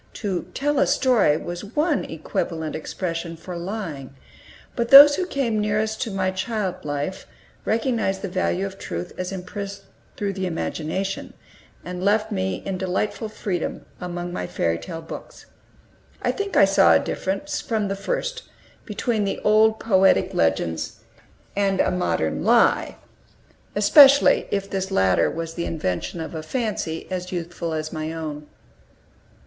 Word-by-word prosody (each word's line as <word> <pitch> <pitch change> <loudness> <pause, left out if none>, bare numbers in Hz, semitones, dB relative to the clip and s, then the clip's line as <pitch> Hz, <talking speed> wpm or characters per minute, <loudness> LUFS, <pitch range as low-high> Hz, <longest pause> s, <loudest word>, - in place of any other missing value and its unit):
To 195 -5 -3
"tell 290 0 +1
a - - +4
story" 230 - +3
was 175 +3 -6
one 305 -1 +1
equivalent 160 0 -3
expression 165 +1 -4
for 180 +2 -8
lying. 170 -8 -5 0.6
But 235 -2 -1
those 285 +1 +11
who 365 +2 -2
came 240 - 0
nearest 215 +1 -1
to 230 - -1
my 190 -1 0
child 190 0 -3
life 145 +5 -4 0.4
recognized 220 -4 0
the - - -1
value 185 0 -1
of 195 0 -7
truth 85 +1 -5
as 185 +1 -3
impressed 195 +1 -6 0.3
through 200 -1 -2
the 190 -1 -2
imagination, 180 +3 -3 0.5
and 180 0 -5
left 215 +2 +2
me 190 -2 -2
in 190 -2 -3
delightful 195 +4 -2
freedom 190 -5 -4
among 175 0 -5
my 90 - -3
fairy 85 0 -1
tale 165 -2 -7
books. 160 - -10 0.8
I - - +2
think 405 -1 -3
I 195 - +8
saw 195 0 +5
a - - +5
difference, 290 +11 -3
from 215 -3 -1
the 195 - -2
first, - - -3 0.4
between 215 +1 -1
the 200 - -2
old 220 +1 +4
poetic 195 -3 +3
legends 80 0 0 0.6
and 195 -1 +1
a - - +3
modern 80 - -1
lie, - - +3 0.8
especially 275 +7 +7
if 200 -1 -1
this 190 -1 -3
latter 95 - +3
was 165 0 -5
the 170 0 -3
invention 150 - -3
of 160 - -5
a 160 - -4
fancy 185 -4 -3
as 180 -1 -4
youthful 170 -1 -4
as 155 +1 -4
my 155 0 -3
own. 150 -2 -6
190 Hz, 150 wpm, -23 LUFS, 165-215 Hz, 0.8 s, those